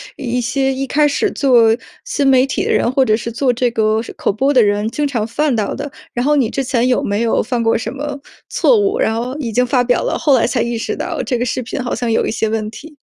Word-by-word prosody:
一 250 -3 -2
些 265 +3 0
一 270 +1 -2
开 295 +3 +2
始 340 +8 0
做 235 -5 +4 0.3
新 285 -2 -1
媒 260 -1 +5
体 270 - -2
的 - - -1
人， - - +2
或 265 +1 +3
者 215 -3 +2
是 235 +1 -5
做 250 +3 +1
这 245 0 0
个 220 -1 +1
是 - - -9
口 - - -1
播 270 +8 +1
的 250 - +5
人， 205 +1 +1
经 290 +5 -1
常 235 -6 -2
犯 275 +4 0
到 215 -2 -1
的。 285 0 -6 0.2
然 245 - -1
后 295 +2 +3
你 245 -5 +1
之 270 - -2
前 250 -1 0
有 250 - +2
没 205 +2 -1
有 230 - +1
犯 240 0 -2
过 225 - +2
什 225 0 -3
么 285 +1 -5 0.3
错 470 - +3
误， 415 +4 0
然 220 - +1
后 250 +3 -4
已 240 -6 -3
经 250 +3 +2
发 250 0 +2
表 245 0 +1
了， - - -1
后 290 -4 +3
来 235 - +2
才 240 -1 0
意 235 0 -2
识 225 - -3
到 - - -3
这 250 - -1
个 - - 0
视 250 +1 -2
频 250 - -4
好 245 - -3
像 240 -2 -2
有 - - +1
一 - - -2
些 220 0 -1
问 215 -1 -2
题？ 300 +6 -12
250 Hz, 300 characters per minute, -17 LUFS, 230-275 Hz, 0.3 s, 媒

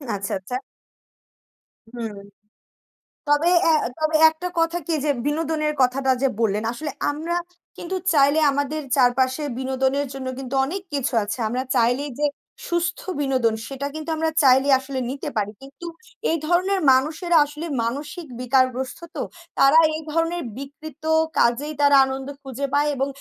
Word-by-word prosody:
আচ্ছা, 200 0 -4
আচ্ছা। 190 +7 -6 1.4
হুম। 230 -3 -5 1.1
তবে 295 +3 +3 0.2
এ - - +6 0.3
তবে 310 0 +1
একটা 320 +3 -6
কথা 330 +1 +1
কি 335 - 0
যে - - +1 0.2
বিনোদনের 305 0 0
কথাটা 260 +1 +2
যে 275 - +4
বললেন, 215 -2 +1
আসলে 290 +5 -5 0.2
আমরা 315 +4 -3 0.4
কিন্তু 360 +2 -4 0.2
চাইলে 285 +1 +4
আমাদের 285 +2 -2
চারপাশে 260 +2 +2
বিনোদনের 265 +2 0
জন্য 265 -1 -6
কিন্তু 270 0 -5
অনেক 370 +8 -4
কিছু 275 -2 -1
আছে। 205 +4 -4
আমরা 250 +4 -2
চাইলেই 245 +5 +2
যে 295 - +2 0.4
সুস্থ 345 0 0 0.2
বিনোদন 260 -5 +1
সেটা 275 +1 -4
কিন্তু 310 +1 -6
আমরা 320 0 +1
চাইলেই 265 +1 +5
আসলে 265 0 -5
নিতে 275 +2 -4
পারি। 210 -1 0
কিন্তু 275 +4 -12 0.4
এই 330 - +1
ধরনের 370 +3 +2
মানুষেরা 315 +6 +2
আসলে 300 +3 -7 0.2
মানসিক 290 +8 -4 0.2
বিকারগ্রস্ত 255 +1 +1 0.2
তো। 285 - -2 0.4
তারা 275 +3 +6 0.2
এই 315 - -4
ধরনের 330 +2 0
বিকৃত 290 +2 -10 0.3
কাজেই 260 +6 +2
তারা 285 -1 +6
আনন্দ 265 0 -5 0.2
খুঁজে 270 +1 -4
পায় 290 +1 +3
এবং 270 +1 0
280 Hz, 145 wpm, -23 LUFS, 260-310 Hz, 1.4 s, এ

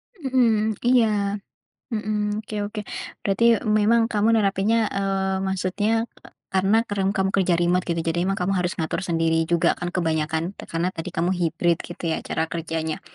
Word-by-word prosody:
Mhm, 235 - +2
iya, 245 -2 +5 0.9
mhm, 215 -1 -2 0.3
oke 215 - -9 0.2
oke, 210 - -5 0.4
berarti 200 +3 +1 0.3
memang 230 +3 +4
kamu 210 +1 +2
nerapinnya, 205 +1 +2
eee, 195 -1 -1
maksudnya 205 +5 0 0.5
karena 195 +3 +3
kadang 195 -1 0
kamu 190 0 +1
kerja 185 -2 +3
remote 175 +1 +2
gitu 170 -1 0
jadi 170 +1 0
emang 195 - 0
kamu 180 +2 +1
harus 180 0 0
ngatur 160 0 -2
sendiri 165 -1 +1
juga 170 0 +3
kan 175 - -4
kebanyakan 160 -1 -1
te - - -9
karena 165 +2 -1
tadi 165 -3 -6
kamu 175 +3 +1
hibrid 170 0 +1
gitu 175 - -9
ya - - 0
cara 160 - 0
kerjanya? 160 -1 -3
190 Hz, 160 wpm, -23 LUFS, 170-210 Hz, 0.9 s, iya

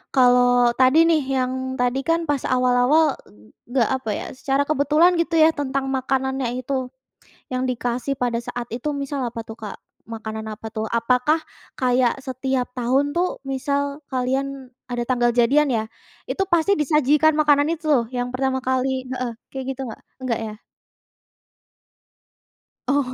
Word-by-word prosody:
kalau 245 -1 +5
tadi 260 +6 +5
nih 320 -3 +3 0.2
yang 255 0 0 0.3
tadi 250 +2 +1
kan 330 0 +1
pas 285 -3 0
awal-awal 255 +4 +3
e 105 +1 -20 0.2
enggak 245 -3 +2
apa 225 - -5
ya? - - -5
Secara 270 +2 0
kebetulan 310 +4 +4
gitu 335 0 0
ya 315 +1 +7
tentang 275 -1 -2
makanannya 265 0 -1 0.2
itu 260 -1 -2 0.6
yang 255 0 -1
dikasih 245 +2 -2
pada 240 -2 0
saat 240 -1 -5
itu, 250 +5 -3
misal 280 0 -3
apa 230 0 -6
tuh, 225 0 -9
Kak? 215 -2 -7 0.3
Makanan 220 -1 -6
apa 220 +1 -7
tuh? 220 0 -3
Apakah 250 +7 +2 0.4
kayak 250 0 +2
setiap 260 -1 -2
tahun 265 +4 +1
tuh 360 +1 0
misal 280 +2 -1
kalian 265 +1 -2 0.2
ada 245 -1 -2
tanggal 240 -1 +2
jadian 275 +5 +4
ya? 220 -1 0 0.5
Itu 390 - 0
pasti 345 +3 +3
disajikan 300 +1 +3
makanan 290 -1 +4
itu 325 0 -15
loh 245 -5 +4
yang 245 0 -2
pertama 260 0 0
kali 260 0 0
heeh, 250 -2 -3 0.2
kayak 265 -1 -5
gitu - - -9
enggak? - - -11 0.2
Enggak 235 -3 -1
ya? 215 -1 -6 2.3
Oh, 270 -2 +1
260 Hz, 150 wpm, -22 LUFS, 245-285 Hz, 2.3 s, ya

